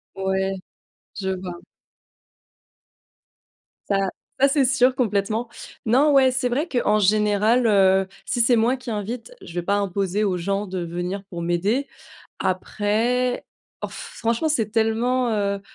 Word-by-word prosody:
Ouais, 190 0 -1 0.7
je 190 -1 -2
vois. 180 -2 -6 2.3
Ça 195 -1 +1 0.3
ça 275 - +7
c'est 280 0 +2
sûr 255 0 +3
complètement. 220 0 0 0.4
Non, 275 +6 +4
ouais, 265 -2 +5
c'est 260 0 0
vrai 280 +8 -1
qu'en 225 -4 +2
général, 210 +4 +3
heu, 190 -2 +4 0.2
si 245 - -2
c'est 240 +1 +5
moi 235 +4 +2
qui 255 -1 -9
invite, 225 - -4
je - - -11
vais 175 - -1
pas 200 +3 +1
imposer 200 0 0
aux 185 -3 0
gens 195 +4 -1
de 185 -2 -4
venir 175 +3 -4
pour 175 -3 -7
m'aider. 195 +11 0 0.5
Après, 220 +6 0 0.4
oh - - -1
f - - -9
franchement, 235 +7 0
c'est 225 -9 0
tellement, 235 +2 +1
heu, 200 -2 0
210 Hz, 140 wpm, -23 LUFS, 195-245 Hz, 2.3 s, ça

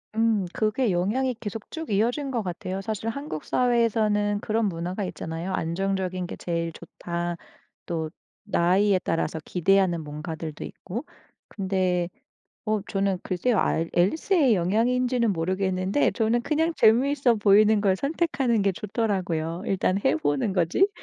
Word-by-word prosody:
음 225 -3 +2
그게 220 +1 +1
영향이 225 +9 0
계속 220 -1 -7
쭉 320 -1 -6
이어진 240 +7 0
것 235 - 0
같아요. 185 +1 -4
사실 220 +1 -4
한국 230 - -4
사회에서는 220 -4 +2
그런 220 0 0
문화가 180 +2 -3
있잖아요. 165 +2 -5
"안정적인 185 +1 -1
게 - - -6
제일 170 -1 -3
좋다." 170 +1 -5 0.5
또 160 -2 -3 0.3
나이에 190 0 +3
따라서 165 -2 -1
기대하는 180 -2 +2
뭔가들도 155 +1 -6
있고. 235 - -7 0.4
근데 185 -3 -1 0.6
어 215 -1 0
저는 195 -2 -1
글쎄요. 215 +6 0
알 165 +1 0
앨리스의 275 - +3
영향인지는 235 +5 +1
모르겠는데 185 - 0
저는 230 +1 +1
그냥 320 +5 0
재미있어 255 +2 +4
보이는 210 +1 +5
걸 195 -2 +2
선택하는 275 - 0
게 195 -1 +2
좋더라고요. 185 -5 -2
'일단 190 -1 +1
해 145 - +3
보는 145 +4 0
거지?' 185 - +2
195 Hz, 320 characters per minute, -25 LUFS, 175-230 Hz, 0.6 s, 보이는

